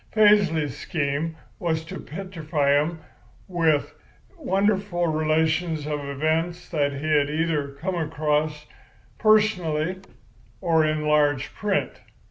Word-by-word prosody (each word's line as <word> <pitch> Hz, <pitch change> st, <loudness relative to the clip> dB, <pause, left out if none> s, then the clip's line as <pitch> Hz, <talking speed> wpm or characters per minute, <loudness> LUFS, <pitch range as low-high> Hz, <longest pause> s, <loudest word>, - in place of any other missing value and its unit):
Paisley's 190 Hz, -, +3 dB
scheme 150 Hz, +1 st, -2 dB, 0.2 s
was 160 Hz, -4 st, -1 dB
to -, -, -7 dB
petrify 160 Hz, -5 st, -2 dB
'em 155 Hz, +3 st, +1 dB, 0.5 s
with 165 Hz, -5 st, +1 dB, 0.4 s
wonderful 195 Hz, -, 0 dB
relations 155 Hz, 0 st, +1 dB
of 150 Hz, -1 st, -2 dB
events 160 Hz, +5 st, -1 dB
that 145 Hz, -4 st, +1 dB
he 140 Hz, +2 st, -5 dB
had 145 Hz, -2 st, +3 dB
either 150 Hz, -2 st, -1 dB
come 185 Hz, +5 st, -2 dB
across 150 Hz, -2 st, -1 dB, 0.5 s
personally 185 Hz, -6 st, +2 dB, 0.6 s
or 165 Hz, -2 st, +3 dB
in 155 Hz, 0 st, 0 dB
large 145 Hz, -2 st, +2 dB
print. 205 Hz, -2 st, -1 dB
160 Hz, 105 wpm, -24 LUFS, 150-175 Hz, 0.6 s, Paisley's